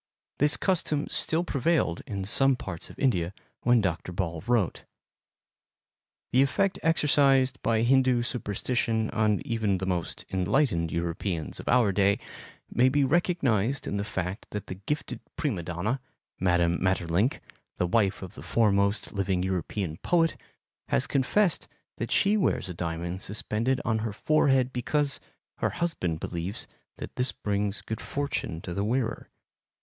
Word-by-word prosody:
This 145 Hz, +1 st, +5 dB
custom 155 Hz, -6 st, 0 dB
still 165 Hz, +2 st, +2 dB
prevailed 140 Hz, -, +1 dB
in 100 Hz, -2 st, -3 dB
some 135 Hz, +6 st, +4 dB
parts 90 Hz, -8 st, -6 dB
of -, -, -13 dB
India 95 Hz, -9 st, +1 dB, 0.3 s
when 120 Hz, -1 st, +4 dB
Dr. 90 Hz, -2 st, -2 dB
Ball 85 Hz, -3 st, -3 dB
wrote. 115 Hz, -8 st, +1 dB, 1.5 s
The 130 Hz, -, +5 dB
effect 190 Hz, +8 st, +1 dB
exercised 140 Hz, -5 st, +3 dB
by 115 Hz, -1 st, +2 dB
Hindu 130 Hz, -1 st, +4 dB
superstition 115 Hz, -1 st, -1 dB
on 110 Hz, -3 st, +1 dB
even 110 Hz, -5 st, 0 dB
the 95 Hz, -, -3 dB
most 90 Hz, -3 st, -3 dB
enlightened 90 Hz, -, +1 dB
Europeans 85 Hz, 0 st, -3 dB
of -, -, -9 dB
our 120 Hz, -5 st, +4 dB
day 100 Hz, +1 st, +3 dB, 0.5 s
may 125 Hz, +2 st, +4 dB
be 145 Hz, +2 st, +2 dB
recognized 135 Hz, -, +1 dB
in 100 Hz, -, -2 dB
the 100 Hz, -, -1 dB
fact 95 Hz, -1 st, -4 dB
that 105 Hz, -2 st, -5 dB
the -, -, -5 dB
gifted 105 Hz, +11 st, -4 dB, 0.2 s
prima 125 Hz, -, -1 dB
donna, 90 Hz, +10 st, -2 dB, 0.4 s
Mme. 85 Hz, -2 st, +2 dB
Maeterlinck, 95 Hz, -, +1 dB, 0.4 s
the -, -, 0 dB
wife 100 Hz, +1 st, +1 dB
of 90 Hz, -, -8 dB
the -, -, -10 dB
foremost 100 Hz, +2 st, +1 dB
living 95 Hz, -2 st, 0 dB
European 95 Hz, -2 st, -2 dB
poet, 165 Hz, -, +2 dB, 0.5 s
has 65 Hz, -, +1 dB
confessed 160 Hz, +7 st, +1 dB, 0.3 s
that -, -, -3 dB
she 205 Hz, +1 st, +3 dB
wears 185 Hz, -, +1 dB
a 90 Hz, -, -5 dB
diamond 85 Hz, +2 st, -4 dB
suspended 110 Hz, +5 st, -1 dB
on 110 Hz, -1 st, +1 dB
her 110 Hz, -1 st, -3 dB
forehead 135 Hz, 0 st, +2 dB
because 140 Hz, +4 st, 0 dB, 0.4 s
her -, -, +1 dB
husband 90 Hz, -, -2 dB
believes 85 Hz, +4 st, -3 dB, 0.3 s
that -, -, -8 dB
this 125 Hz, 0 st, +2 dB
brings 100 Hz, 0 st, -2 dB
good 110 Hz, -, -5 dB
fortune 140 Hz, -, -3 dB
to 90 Hz, -, -5 dB
the 100 Hz, -, -1 dB
wearer. 115 Hz, +2 st, -1 dB
110 Hz, 145 wpm, -28 LUFS, 95-135 Hz, 1.5 s, This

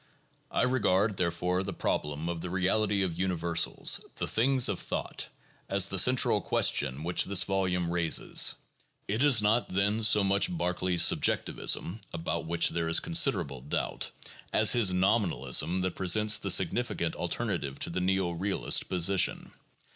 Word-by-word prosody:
I -, -, -1 dB
regard, 105 Hz, -6 st, 0 dB
there 90 Hz, -1 st, +1 dB
fore, 90 Hz, +2 st, -2 dB
the 95 Hz, 0 st, -5 dB
problem 75 Hz, 0 st, -3 dB
of 85 Hz, -1 st, -4 dB
the 90 Hz, -, -6 dB
reality 100 Hz, +2 st, 0 dB
of 85 Hz, -2 st, -4 dB
universals, 85 Hz, -2 st, +1 dB
"the -, -, -4 dB
things 130 Hz, +2 st, +2 dB
of -, -, -2 dB
thought, -, -, -6 dB
' -, -, -33 dB
' -, -, -37 dB
as 100 Hz, 0 st, +2 dB
the 95 Hz, -, 0 dB
central 125 Hz, +6 st, +3 dB
question 70 Hz, +1 st, +1 dB
which 85 Hz, +1 st, -1 dB
this 100 Hz, 0 st, +3 dB
volume 90 Hz, -3 st, -2 dB
raises. 85 Hz, -2 st, +1 dB, 0.5 s
It 110 Hz, +7 st, -1 dB
is 130 Hz, -7 st, +4 dB
not, 110 Hz, +3 st, +1 dB
then, 100 Hz, +4 st, 0 dB
so 105 Hz, -1 st, +5 dB
much 100 Hz, -, +1 dB
Berkeley's 90 Hz, -, +1 dB
subjectivism 100 Hz, +6 st, 0 dB
(about 85 Hz, 0 st, -4 dB
which 85 Hz, 0 st, +1 dB
there 85 Hz, -1 st, -3 dB
is 80 Hz, -, +4 dB
consid 85 Hz, -, +3 dB
erable 70 Hz, +1 st, -7 dB
doubt) -, -, -3 dB, 0.4 s
as 110 Hz, -, +4 dB
his 115 Hz, -6 st, +4 dB
nominalism 90 Hz, -, +1 dB
that 95 Hz, -1 st, -2 dB
presents 105 Hz, +3 st, +2 dB
the -, -, -4 dB
significant -, -, 0 dB
alter -, -, -4 dB
native 70 Hz, -1 st, -4 dB
to -, -, -2 dB
the 90 Hz, +2 st, -3 dB
neo 95 Hz, -1 st, 0 dB
realist 95 Hz, +4 st, -1 dB
position. 90 Hz, +1 st, 0 dB
95 Hz, 160 wpm, -28 LUFS, 85-105 Hz, 0.5 s, so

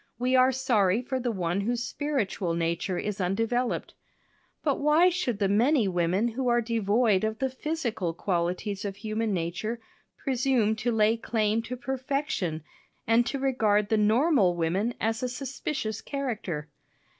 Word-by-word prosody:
We 255 Hz, +1 st, +1 dB
are 255 Hz, +1 st, +5 dB
sorry 235 Hz, -5 st, +2 dB
for 260 Hz, +1 st, -2 dB
the 245 Hz, -1 st, -1 dB
one 180 Hz, -2 st, -1 dB
whose 240 Hz, +3 st, -1 dB
spiritual 235 Hz, -, -2 dB
nature 170 Hz, +2 st, -1 dB
is 205 Hz, +1 st, -3 dB
undeveloped. 225 Hz, +7 st, -1 dB, 0.7 s
But 285 Hz, -3 st, +1 dB
why 305 Hz, +5 st, +5 dB
should 340 Hz, -, -1 dB
the 200 Hz, -1 st, +1 dB
many 230 Hz, +4 st, +3 dB
women 180 Hz, +5 st, +1 dB
who 250 Hz, +3 st, -3 dB
are 240 Hz, 0 st, +4 dB
devoid 220 Hz, -2 st, +2 dB
of 220 Hz, 0 st, -1 dB
the 265 Hz, +2 st, -1 dB
physical 255 Hz, -, -2 dB
qualities 180 Hz, +3 st, -2 dB
of 200 Hz, -2 st, -4 dB
human 215 Hz, +1 st, -2 dB
nature 185 Hz, +6 st, -2 dB, 0.4 s
presume 255 Hz, -5 st, +1 dB
to 240 Hz, +2 st, 0 dB
lay 220 Hz, 0 st, +3 dB
claim 220 Hz, -1 st, 0 dB
to 250 Hz, +2 st, -6 dB
perfection 260 Hz, -, -2 dB, 0.4 s
and 230 Hz, +2 st, +3 dB
to 275 Hz, -, -2 dB
regard 220 Hz, -6 st, +1 dB
the 220 Hz, -, +3 dB
normal 215 Hz, -, +3 dB
woman 185 Hz, +8 st, 0 dB
as 225 Hz, 0 st, -1 dB
a 255 Hz, -, -1 dB
suspicious 255 Hz, -3 st, -4 dB
character? 215 Hz, -, -4 dB
225 Hz, 150 wpm, -27 LUFS, 200-255 Hz, 0.7 s, are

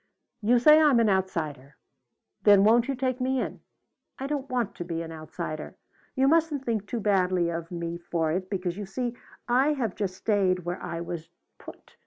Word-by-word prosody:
"You 235 Hz, +4 st, +4 dB
say 300 Hz, +6 st, +7 dB
I'm 290 Hz, -6 st, +5 dB
an 220 Hz, -3 st, +3 dB
outsider. 155 Hz, -8 st, -2 dB, 0.7 s
Then 200 Hz, -1 st, +6 dB
won't 230 Hz, +3 st, +4 dB
you 275 Hz, -, -1 dB
take 255 Hz, 0 st, -2 dB
me 260 Hz, +1 st, +1 dB
in? -, -, -4 dB, 0.6 s
I 270 Hz, -, -5 dB
don't 280 Hz, -1 st, -3 dB
want 245 Hz, -5 st, -1 dB
to -, -, -4 dB
be 165 Hz, -1 st, -4 dB
an 165 Hz, -, -8 dB
outsider. 155 Hz, 0 st, -6 dB, 0.4 s
You 265 Hz, +1 st, +3 dB
mustn't 310 Hz, -3 st, +2 dB
think 220 Hz, -4 st, -1 dB
too 235 Hz, -, -3 dB
badly 185 Hz, -4 st, +2 dB
of 165 Hz, 0 st, -4 dB
me 170 Hz, -1 st, -4 dB
for 165 Hz, -2 st, -1 dB
it 185 Hz, +2 st, -2 dB
because 180 Hz, -2 st, -3 dB
you 205 Hz, -, -5 dB
see 240 Hz, +4 st, -3 dB, 0.3 s
I 260 Hz, +5 st, +3 dB
have 235 Hz, -9 st, -2 dB
just 190 Hz, -3 st, -3 dB
stayed 185 Hz, -3 st, +1 dB
where 175 Hz, +1 st, -4 dB
I 170 Hz, 0 st, -4 dB
was 170 Hz, -1 st, -6 dB, 0.3 s
put. -, -, -14 dB
200 Hz, 190 wpm, -27 LUFS, 170-250 Hz, 0.7 s, say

